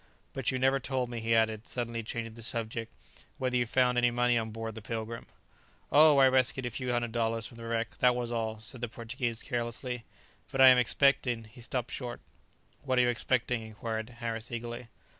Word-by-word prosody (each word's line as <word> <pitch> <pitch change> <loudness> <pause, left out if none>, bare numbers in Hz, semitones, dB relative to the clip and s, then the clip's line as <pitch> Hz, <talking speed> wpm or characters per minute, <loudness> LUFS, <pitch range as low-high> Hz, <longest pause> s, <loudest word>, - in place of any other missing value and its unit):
But 135 -3 -1
you 130 - 0
never 135 +1 +3
told 130 -2 -2
me," 120 - -4
he 115 0 +1
added, 110 0 +1
suddenly 115 -2 -3
changing 115 0 -5
the 115 - -11
subject, 115 0 -3 0.5
"whether 130 -1 -1
you 120 -1 +2
found 125 +1 +3
any 120 0 +4
money 120 0 +2
on 110 -1 0
board 115 +1 -5
the 110 - -8
'Pilgrim'!" 115 +2 -5 0.6
"Oh, 150 0 +7
I 135 -1 +7
rescued 130 0 +3
a 120 - -2
few 125 +2 -3
hundred 120 -1 0
dollars 115 -1 -1
from 115 - -10
the 115 - -8
wreck, 115 0 -2
that 125 -1 +5
was 120 -1 -3
all," 110 -2 -2
said 115 +3 -7
the 120 - -2
Portuguese 115 0 -4
carelessly; 120 -1 -3 0.5
"but 135 - -3
I 130 0 +10
am 125 -1 +7
expecting...." 125 -2 +2
he 110 +3 -14
stopped 120 +1 -3
short. 125 -2 -5 0.6
"What 130 -2 0
are 125 - +6
you 120 - +3
expecting?" 120 0 0
inquired 110 +1 -5
Harris 115 -1 -5
eagerly. 120 +1 -5
120 Hz, 200 wpm, -30 LUFS, 115-125 Hz, 0.6 s, I